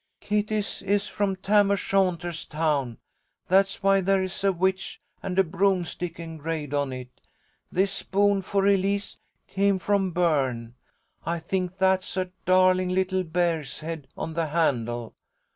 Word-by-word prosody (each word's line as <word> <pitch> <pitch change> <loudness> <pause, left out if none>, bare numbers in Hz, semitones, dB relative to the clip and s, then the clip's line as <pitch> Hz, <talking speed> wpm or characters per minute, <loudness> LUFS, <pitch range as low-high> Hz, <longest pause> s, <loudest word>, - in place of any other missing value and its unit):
Kitty's 210 0 -1
is 200 +1 +1
from 200 -2 -1
Tam 200 +2 +3
O'Shanter's 185 -4 0
town. 150 -6 -1 0.5
That's 195 +1 +3
why 195 0 +4
there 195 0 +2
is 185 +1 -5
a 195 - +4
witch 190 +1 -1 0.2
and 190 -1 -4
a 190 - +6
broomstick 180 -1 -1
engraved 160 -3 -5
on 140 -2 0
it. 125 -1 -9 0.5
This 190 +2 +2
spoon 200 0 +1
for 195 +1 0
Elise 200 0 +1 0.3
came 200 0 +1
from 195 0 +1
Berne. 135 -9 0 0.5
I 170 +1 -1
think 185 +2 -3
that's 190 0 +1
a 185 -1 -1 0.2
darling 185 0 +4
little 185 0 +1
bear's 165 -5 -1
head 160 -3 -6
on 160 - -4
the 165 0 -1
handle. 120 -7 0
185 Hz, 140 wpm, -26 LUFS, 160-195 Hz, 0.5 s, a